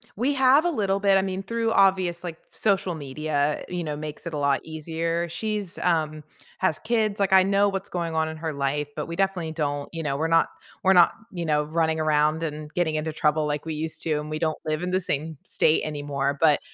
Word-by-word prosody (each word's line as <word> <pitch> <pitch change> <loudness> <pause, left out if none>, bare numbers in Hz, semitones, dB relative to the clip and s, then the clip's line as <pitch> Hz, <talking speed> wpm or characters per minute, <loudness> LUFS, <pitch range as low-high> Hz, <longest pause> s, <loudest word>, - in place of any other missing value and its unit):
We 255 +7 +1
have 265 +4 +5
a - - +3
little 200 - 0
bit, 200 -1 +4
I - - +3
mean, 190 0 -3
through, 230 +1 -1
obvious 190 -4 +3
like, 170 -2 -5
social 195 -4 0
media, 145 0 -1
you 180 -1 -3
know, 150 -2 -3
makes 150 +2 -7
it 170 - -5
a - - -2
lot 140 -1 +2
easier, 165 +2 -2
she's, 210 +1 -3
um 155 -3 0 0.4
has 175 -5 +1
kids, 220 -1 0
like, 195 -1 +2
I 190 -1 +8
know 200 +1 +3
what's 195 0 -4
going 170 -2 -3
on 160 0 +1
in 160 - -5
her 160 0 -3
life, 140 +1 -1
but 150 - -3
we 170 - -6
definitely 185 -4 0
don't 145 -3 -2
you 165 - -3
know, 140 -3 -1
we're 160 +2 0
not 165 0 +4 0.4
we're 190 0 +5
not, 175 -2 +7 0.2
you 175 -4 -4
know, 150 -1 +2
running 160 +1 0
around 155 0 +2
and 150 -1 -5
getting 165 -2 0
into 155 +1 -2
trouble 150 0 +1
like 150 0 -2
we 160 - -3
used 155 +1 -4
to, 160 - 0
and 150 - -6
we 155 0 -3
don't 155 -1 0
live 155 0 -1
in 180 - -1
the 185 +1 +1
same 155 -1 -3
state 155 - +2
anymore, 145 -2 -2
but 155 -3 +5
160 Hz, 230 wpm, -25 LUFS, 150-190 Hz, 0.4 s, I